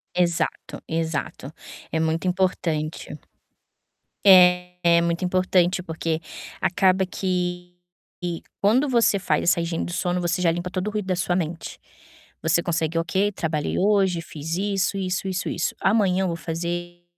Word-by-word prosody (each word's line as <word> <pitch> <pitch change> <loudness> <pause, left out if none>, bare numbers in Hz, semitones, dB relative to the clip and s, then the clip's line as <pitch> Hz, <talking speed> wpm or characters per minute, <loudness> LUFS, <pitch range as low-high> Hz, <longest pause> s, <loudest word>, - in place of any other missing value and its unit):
Exato, 175 -2 -1
exato. 160 -3 -3 0.4
É 160 - 0
muito 160 +2 0
importante. 170 -4 -1 1.1
É, 180 -2 +5
muito 170 +1 -1
importante 180 0 +2
porque 160 -1 -3 0.4
acaba 190 0 +3
que 180 -1 -3 0.5
e 175 -2 -3 0.2
quando 235 +8 +3
você 230 -5 +3
faz 180 - 0
essa 170 -1 +3
higiene 165 0 -2
do 175 - -6
sono, 180 0 -1
você 180 +1 -1
já 175 - +3
limpa 175 +2 -3
todo 185 +2 -3
o - - -1
ruído 210 -2 -3
da 185 - +1
sua 175 0 0
mente. 165 -1 -4 0.6
Você 160 +2 +2
consegue: 165 -1 -1
"Ok, 190 +5 +1
trabalhei 160 -5 -2
hoje, 195 -3 +2
fiz 160 0 -5
isso, 195 0 0
isso, 185 0 -2
isso, 190 -1 -2
isso. 165 - -2
Amanhã 190 -2 +2
eu - - +1
vou 170 - -2
fazer 175 +1 -5
180 Hz, 145 wpm, -24 LUFS, 165-185 Hz, 1.1 s, É